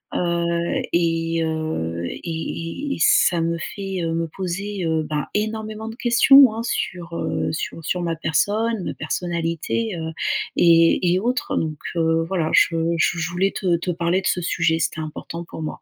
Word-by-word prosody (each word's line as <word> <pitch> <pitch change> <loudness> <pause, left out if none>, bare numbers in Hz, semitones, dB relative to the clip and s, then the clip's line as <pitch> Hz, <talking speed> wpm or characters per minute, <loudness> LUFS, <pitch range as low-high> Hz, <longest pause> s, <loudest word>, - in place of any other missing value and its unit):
Heu, 170 -1 0
et 165 -1 +1
heu, 155 - -2
et - - -6
et 165 - -4
et - - -8
ça 170 0 +4
me 170 0 0 0.2
fait, 195 -2 -4
heu, 165 0 -1
me 165 0 -1
poser, 190 +2 -4
heu, 160 -1 +1
bah, 150 0 -3
énormément 220 +1 -3
de 225 - -8
questions 255 0 +6
hein 225 - -3
sur, 170 -7 -3
heu, - - -1
sur 165 +1 -4
sur 180 - -1
ma 165 -1 -1
personne, 205 +7 0
ma - - -3
personnalité, 175 +5 -2
heu, 160 0 -4 0.5
et 170 +1 +5
et 185 - +2
autres 245 +4 -1
donc, 155 -2 -2 0.2
heu, 165 0 +2
voilà. 170 -4 -1
Je 165 - +5 0.2
je 170 +1 +2
je 160 - -1
voulais 190 +3 +1
te 175 -3 +2
te 175 - -5
parler 170 +2 0
de - - -2
ce 180 - +1
sujet. 165 -1 +1
C'était 160 - -1
important 165 +2 -6
pour 160 - -9
moi. 155 - -5
170 Hz, 180 wpm, -22 LUFS, 165-195 Hz, 0.5 s, questions